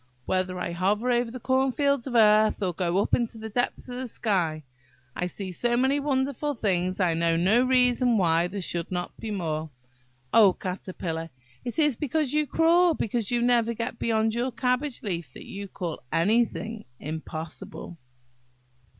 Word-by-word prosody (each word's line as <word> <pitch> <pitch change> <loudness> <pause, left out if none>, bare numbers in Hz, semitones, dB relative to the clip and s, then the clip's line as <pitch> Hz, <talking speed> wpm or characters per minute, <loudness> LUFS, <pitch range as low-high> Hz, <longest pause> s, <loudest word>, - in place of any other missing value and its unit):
"Whether 185 0 -1
I 180 - -3
hover 205 +8 +1
over 240 -1 +1
the 255 +2 -7
corn 260 +2 +2
fields 280 -1 +1
of 250 - -4
earth, 215 -1 +5
or 180 -2 0
go 175 +1 0
up - - -6
into 235 -1 +1
the 220 0 -7
depths 245 +4 -1
of 250 0 -6
the 255 0 -4
sky, 175 -9 0 0.5
I 180 - -1
see 190 +1 -6
so 240 +6 0
many 265 +3 +2
wonderful 280 +1 -1
things, 185 -4 0
I 180 -3 +3
know 165 0 +2
no 195 +8 +4
reason 250 -2 +3
why 170 -2 +3
there 195 +2 -5
should 170 -1 -2
not 180 -1 -3
be 225 - -5
more. 160 -6 -2 0.6
Oh, 205 -5 +7
Caterpillar! 180 -3 -5 0.3
it 240 - -5
is 295 -5 +3
because 295 -1 -1
you 300 0 +1
crawl, 335 +2 +4
because 225 -1 -2
you 240 -1 +1
never 235 -1 +2
get 230 +1 -4
beyond 220 -1 +1
your 245 +3 -1
cabbage 250 +3 -1
leaf, 170 - -4
that - - -10
you 200 0 -7
call 175 -4 -5
any 205 +9 +3
thing 225 0 -7
impossible." 160 +3 -7
220 Hz, 175 wpm, -26 LUFS, 180-250 Hz, 0.6 s, Oh